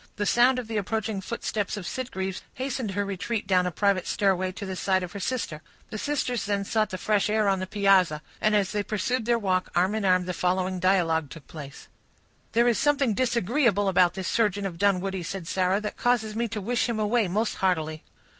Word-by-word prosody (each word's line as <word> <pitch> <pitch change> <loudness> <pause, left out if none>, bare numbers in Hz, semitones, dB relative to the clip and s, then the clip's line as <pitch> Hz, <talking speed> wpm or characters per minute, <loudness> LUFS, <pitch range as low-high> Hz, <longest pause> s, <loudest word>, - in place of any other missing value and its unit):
The 205 - -2
sound 245 +4 +4
of 250 -3 -4
the 225 -1 -3
approaching 215 0 -2
footsteps 210 -1 -3
of 195 - -6
Sitgreaves 190 -6 -4
hastened 255 -3 -3
her 205 +1 -1
retreat 200 +3 -3
down 185 -2 +2
a - - -2
private 195 +1 +1
stairway, 185 -3 +1
to 200 - -6
the 190 -1 -4
side 185 0 +1
of 180 - -6
her 200 - -6
sister. 195 -9 -3 0.3
The 215 - -4
sisters 255 -4 -1
then 200 -1 0
sought 215 0 +1
the 185 - -4
fresh 210 +1 +1
air 215 -1 +2
on 195 -1 +2
the 185 - -4
piazza; 185 -6 +3 0.2
and 215 0 +3
as 200 -3 +1
they 210 - 0
pursued 220 +4 -1
their 235 0 +3
walk, 190 -4 0
arm 185 +3 +2
in 220 -1 -1
arm, 185 -1 +3
the 180 - -3
following 185 +1 0
dialogue 170 -5 +2
took 160 -1 -11
place:— 145 -2 -10 0.7
"There 235 +1 +4
is 235 - +2
something 280 -5 +2
disagreeable 235 -2 +1
about 180 -2 +3
this 190 -2 -4
surgeon 205 -3 +1
of 175 -4 -5
Dunwoodie," 195 -1 +1
said 175 0 -5
Sarah, 185 +2 +1
"that 210 - -5
causes 230 -3 +1
me 235 +1 0
to 220 -1 -4
wish 240 +4 0
him 235 - -1
away 215 0 +2
most 210 +5 -1
heartily." 160 -4 0
200 Hz, 210 wpm, -26 LUFS, 185-225 Hz, 0.7 s, sound